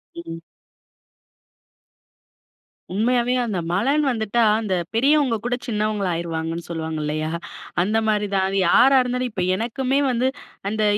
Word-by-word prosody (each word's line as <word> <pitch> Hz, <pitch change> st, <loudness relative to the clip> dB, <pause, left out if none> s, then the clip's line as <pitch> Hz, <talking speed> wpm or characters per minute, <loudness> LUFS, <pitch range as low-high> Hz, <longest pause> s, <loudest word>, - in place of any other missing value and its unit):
ம். 165 Hz, -1 st, -7 dB, 2.5 s
உண்மையாவே 240 Hz, +4 st, +1 dB
அந்த 205 Hz, -6 st, -2 dB
மழைன்னு 275 Hz, +11 st, +2 dB
வந்துட்டா, 230 Hz, -1 st, +1 dB, 0.2 s
அந்த 210 Hz, -4 st, -2 dB, 0.2 s
பெரியவங்க 275 Hz, 0 st, +3 dB
கூட 245 Hz, 0 st, +1 dB
சின்னவங்களா 210 Hz, -4 st, -1 dB
ஆயிருவாங்கன்னு 165 Hz, 0 st, -3 dB
சொல்லுவாங்க 160 Hz, -2 st, -4 dB
இல்லையா? 155 Hz, +1 st, -2 dB, 0.5 s
அந்த 210 Hz, +5 st, +1 dB
மாரி 210 Hz, -1 st, +1 dB
தான் 190 Hz, 0 st, +1 dB
யாரா 265 Hz, +9 st, +6 dB
இருந்தாலும் 250 Hz, 0 st, -1 dB
இப்போ 190 Hz, -4 st, -2 dB
எனக்குமே 255 Hz, +6 st, -1 dB
வந்து 250 Hz, +1 st, +1 dB, 0.4 s
அந்த 215 Hz, +1 st, -1 dB
215 Hz, 115 wpm, -22 LUFS, 175-250 Hz, 2.5 s, யாரா